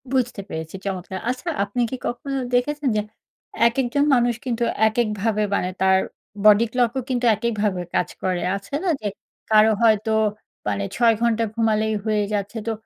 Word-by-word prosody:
বুঝতে 245 -5 0
পেরেছি, 160 +2 -6
চমৎকার! 190 -1 -4
আচ্ছা 255 +7 -3
আপনি 205 +5 -2
কি 260 - -3
কখনো 275 +3 -3 0.2
দেখেছেন 290 +3 0
যে, - - +2 0.7
একেকজন 265 +4 +1
মানুষ 240 -1 +2
কিন্তু 240 -2 -1 0.2
এক 220 - -3
এককভাবে 215 0 -1
মানে 180 - 0
তার 190 0 +5 0.5
বডি 210 +2 +7
ক্লক 245 -2 +2
ও - - +2
কিন্তু 250 -1 0
একেকভাবে 210 -5 -1
কাজ - - +1
করে। 185 -2 0 0.2
আছে 200 +6 -14
না 375 - +1
যে, 210 - -2 0.4
কারো 215 0 +6
হয়তো 220 -1 +3 0.6
মানে 100 0 -1
৬ 235 -1 +4
ঘন্টা 230 -1 +2
ঘুমালেই 220 -1 +1
হয়ে 215 -1 +1
যাচ্ছে 205 +2 -2
তো - - +1
220 Hz, 165 wpm, -22 LUFS, 205-245 Hz, 0.7 s, বডি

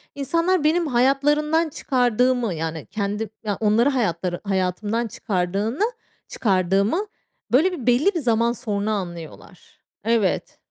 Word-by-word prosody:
insanlar 335 +5 +1
benim 325 +2 +2
hayatlarından 295 +5 +2
çıkardığımı, 245 -4 +1
yani, 160 -1 -4
kendi 210 +1 -3
ya, 205 -2 -2
onları 225 +5 +3
hayatları 180 - -1
hayatımdan 205 +4 -1
çıkardığını, 205 - -2 0.4
çıkardığımı, 195 - +1 0.5
böyle, 320 +10 +4
bir 270 -10 -6
belli 260 +12 +4
bir - - +1
zaman 235 -3 +2
sonra 215 -3 -2
anlıyorlar. 175 -2 -7 0.2
Evet. 225 -3 0
230 Hz, 110 wpm, -23 LUFS, 195-275 Hz, 0.5 s, böyle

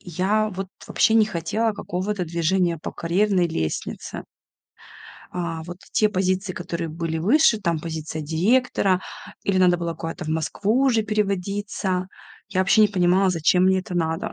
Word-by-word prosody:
я 195 +5 0
вот 190 -1 -5 0.2
вообще 220 - +2
не 220 -1 +6
хотела 215 +4 -1
какого-то 190 -1 -3
движения 170 +1 0
по - - -6
карьерной 180 +1 +1
лестнице. 80 - -4 1.1
А, 170 -2 -3
вот 175 +2 -8
те 215 - +3
позиции, 185 -1 -1
которые 170 -1 -4
были 165 0 -3
выше, 230 - +4
там 170 -4 0
позиция 160 -1 -5
директора 185 - +2 0.4
или 195 -1 +1
надо 180 -1 +5
было 170 -1 -3
куда-то 165 +2 -6
в - - -6
Москву 200 - 0
уже 230 -5 +3
переводиться. 200 -2 -2 0.4
Я 185 -1 0
вообще 195 +3 +4
не 210 - +5
понимала, 185 0 +3
зачем 180 +2 +3
мне 190 0 +4
это 185 -1 -6
надо. 165 0 -1
185 Hz, 150 wpm, -23 LUFS, 170-205 Hz, 1.1 s, не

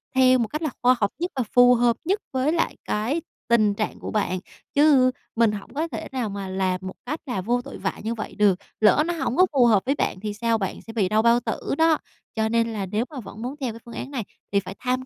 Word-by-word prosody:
theo 255 -1 +5
một 230 - +1
cách 305 +8 -4
là 310 - 0
khoa 250 +1 +5
học 205 -1 +1
nhất 350 +2 -2
và 260 - 0
phù 245 0 +7
hợp 235 -1 +2
nhất 395 +4 +1
với 265 +3 +1
lại 330 - 0
cái 245 +10 -1 0.3
tình 215 -3 +4
trạng 215 +1 -3
của - - -6
bạn. 195 -3 0 0.3
Chứ 280 -3 +5 0.2
mình 230 -2 +4
hổng 205 +4 -7
có 315 +4 -1
thể 230 - -5
nào 245 -5 -2
mà 195 -1 -5
làm 185 -1 0
một 185 - -6
cách 305 +5 -3
là 245 -9 -2
vô 240 +5 0
tội - - -9
vạ - - -3
như 225 - -1
vậy 215 - -6
được, 200 -3 +3 0.2
lỡ 220 +8 +5
nó 345 - -1
hổng 270 -6 -2
có 370 - +7
phù 255 -3 +5
hợp 210 -5 +4
với 275 +2 +1
bạn 185 - -1
thì 210 +1 -4
sao, 230 +1 +1
bạn 195 -3 -4
sẽ 225 - -10
bị 200 -5 +1
đau 215 +1 +3
bao 235 +1 +4
tử - - -3 0.2
đó. 320 -1 +4 0.4
Cho 220 0 +1
nên 230 0 +1
là 200 -2 -2
nếu 215 +6 -1
mà 290 - -7
vẫn 210 -1 -9
muốn 255 +4 -4
theo 240 -4 -2
cái 230 - -10
phương 235 - -10
án 275 - -6
này 250 -6 -3 0.3
thì 200 - +3
phải 190 0 -8
tham 255 0 -1
235 Hz, 265 wpm, -24 LUFS, 210-260 Hz, 0.4 s, phù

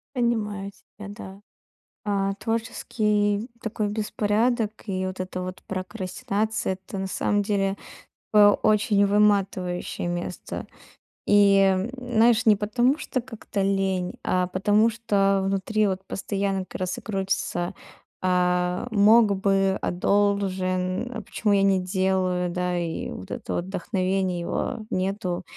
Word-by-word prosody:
Понимаю 210 -5 -1
тебя, 205 +1 -13
да. 200 -1 -10 0.6
А, 195 -1 0
творческий 210 -1 -1
такой 215 -1 -2
беспорядок 215 +2 0
и 185 -2 -2
вот 185 0 -6
эта 185 0 -4
вот 185 0 -7
прокрастинация- 195 +2 -2
это 195 - -6
на 190 - -2
самом 205 +2 0
деле, 195 -1 0 0.6
э, 210 -1 +8 0.2
очень 210 -1 +3
выматывающее 195 -4 +1
место. 175 +1 -5 0.6
И, 200 -1 +6
м, 195 +3 +3
знаешь, 240 -1 +3
не 215 -2 +7
потому, 240 +8 +1
что 255 - -2
как-то 225 -4 -5
лень, 195 -2 0
а 180 0 +1
потому 205 +4 +3
что 200 -4 +1
внутри 195 +2 +1
вот 190 -1 -2
постоянно 195 -1 -2
как - - -9
раз 185 0 -2
и - - -6
крутится: 195 -3 -2 0.5
"А 180 +3 +1
мог 210 0 +5
бы, 195 -1 +2
а - - -1
должен, 190 +2 0
а 225 - -4
почему 205 +1 -1
я 200 -1 +4
не 195 -1 +3
делаю, 185 -1 0
да?" 180 0 -1
И 170 -2 -3
вот 95 - -9
это - - -4
вот 175 - -2
вдохновение, 185 -2 -1
его 170 - -2
нету, 185 -1 -2
195 Hz, 130 wpm, -25 LUFS, 185-210 Hz, 0.6 s, э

